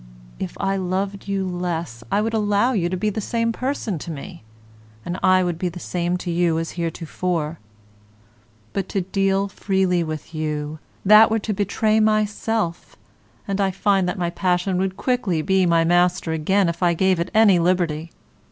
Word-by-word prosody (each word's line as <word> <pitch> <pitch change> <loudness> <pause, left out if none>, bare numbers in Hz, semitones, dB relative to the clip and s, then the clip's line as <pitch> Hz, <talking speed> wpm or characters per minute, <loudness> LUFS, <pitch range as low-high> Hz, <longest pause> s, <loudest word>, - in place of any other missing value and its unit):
If 95 - -5
I 195 0 0
loved 195 +2 -3
you 195 -1 -1
less 170 -9 -4
I 205 - +2
would 225 +1 -1
allow 210 +3 +2
you 175 -6 0
to 185 - -2
be 210 +3 0
the 220 - -3
same 230 +2 0
person 235 - -3
to 170 - -8
me, 170 +4 -8 0.6
and 180 +2 -4
I 185 0 +4
would 175 -2 -2
be 180 - -1
the 175 +1 -9
same 175 0 -2
to 175 - -1
you 170 -1 +1
as 165 0 -3
heretofore. 165 -1 -3 1.1
But 195 -1 -2
to 195 - -1
deal 195 +1 0
freely 190 -3 0
with 155 0 -6
you, 155 -1 -3 0.3
that 215 +2 +8
were 220 - +1
to 215 0 -2
betray 215 +2 +1
myself, 215 -3 0 0.5
and 200 0 -1
I 195 - +2
find 190 -1 +1
that - - -3
my 175 -1 -1
passion 180 +1 0
would 190 0 -1
quickly 210 -12 0
be 190 0 +2
my 165 -1 +3
master 175 0 +2
again 185 +5 +2
if 170 +1 -3
I 175 -1 +3
gave 190 0 +2
it 170 - -2
any 210 -5 +6
liberty. 170 -2 0
185 Hz, 180 wpm, -22 LUFS, 170-200 Hz, 1.1 s, that